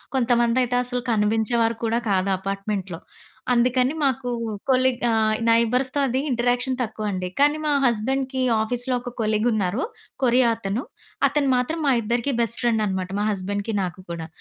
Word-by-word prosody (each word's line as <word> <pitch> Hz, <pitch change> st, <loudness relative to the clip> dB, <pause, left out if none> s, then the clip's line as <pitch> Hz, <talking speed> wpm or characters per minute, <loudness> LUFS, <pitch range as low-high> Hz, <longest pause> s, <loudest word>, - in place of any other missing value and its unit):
కొంతమంది 240 Hz, -1 st, +2 dB
అయితే 245 Hz, 0 st, 0 dB
అసలు 245 Hz, 0 st, -1 dB
కనిపించేవారు 225 Hz, +2 st, +1 dB
కూడా 230 Hz, +1 st, +1 dB
కాదు 195 Hz, 0 st, +1 dB
అపార్ట్మెంట్‌లో. 195 Hz, -2 st, -4 dB, 0.5 s
అందుకని 250 Hz, +2 st, +2 dB
మాకు 265 Hz, -2 st, 0 dB, 0.4 s
కొలీగ్ 255 Hz, -1 st, +2 dB
ఆహ్, 220 Hz, -1 st, +2 dB
నై‌బర్స్‌తో 250 Hz, +4 st, +2 dB
అది 260 Hz, +1 st, 0 dB
ఇంటరాక్షన్ 245 Hz, +1 st, +1 dB
తక్కువండి. 210 Hz, -5 st, -3 dB
కానీ 295 Hz, +2 st, +4 dB
మా 300 Hz, -, +1 dB
హస్బెండ్‌కి 260 Hz, +3 st, 0 dB, 0.2 s
ఆఫీస్‌లో 245 Hz, +3 st, -1 dB
ఒక 245 Hz, -, -7 dB
కొలీగ్ 215 Hz, +1 st, +1 dB
ఉన్నారు, 205 Hz, +2 st, 0 dB, 0.4 s
కొరియా 245 Hz, -1 st, +4 dB
అతను. 215 Hz, +2 st, -3 dB, 0.5 s
అతను 280 Hz, 0 st, 0 dB
మాత్రం 250 Hz, +7 st, -1 dB
మా 275 Hz, -, +4 dB
ఇద్దరికి 235 Hz, +5 st, -1 dB
బెస్ట్ 235 Hz, -1 st, +1 dB
ఫ్రెండ్ 230 Hz, -2 st, +1 dB
అనమాట. 190 Hz, -2 st, -2 dB
మా -, -, 0 dB
హస్బెండ్‌కి 200 Hz, +3 st, -3 dB
నాకు 180 Hz, 0 st, -4 dB
కూడా. 165 Hz, -1 st, -5 dB
235 Hz, 145 wpm, -23 LUFS, 210-255 Hz, 0.5 s, కానీ